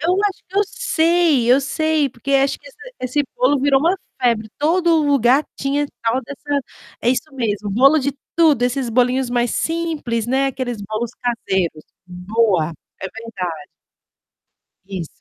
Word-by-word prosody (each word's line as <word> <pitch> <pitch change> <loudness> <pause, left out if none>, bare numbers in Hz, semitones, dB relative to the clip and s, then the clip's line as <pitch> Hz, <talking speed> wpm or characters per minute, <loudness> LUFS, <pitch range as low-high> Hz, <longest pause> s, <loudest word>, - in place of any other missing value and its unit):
Eu 345 +4 +2
acho 390 - -5
que 385 - -9
eu 410 - +5
sei, 335 - +2
eu 265 - +5
sei, 305 +2 +1
porque 265 +2 -5
acho 275 0 +2
que - - -20
esse - - -19 0.2
esse 255 +3 0
bolo 485 - +3
virou 275 0 +3
uma 340 +6 +2 0.2
febre, 230 -3 +1
todo 335 +3 +3
lugar 275 -1 +4
tinha 285 +1 0 0.2
tal 230 +3 +1
dessa 285 +2 -3 0.4
é - - 0
isso 260 +4 0
mesmo, 210 -4 -2
bolo 275 +9 +5
de 280 0 -1 0.2
tudo, 310 -7 +4
esses 250 0 0
bolinhos 250 +1 +2
mais 240 -1 +1
simples, 315 -9 -2
né, 265 +2 +2
aqueles 255 -3 -3
bolos 215 +3 -3
caseiros, 190 -9 -1 0.2
boa, 180 -2 0 0.3
é 190 - -3
verdade. 185 -9 -6 1.2
Isso. 185 -5 -5
260 Hz, 155 wpm, -20 LUFS, 230-295 Hz, 1.2 s, eu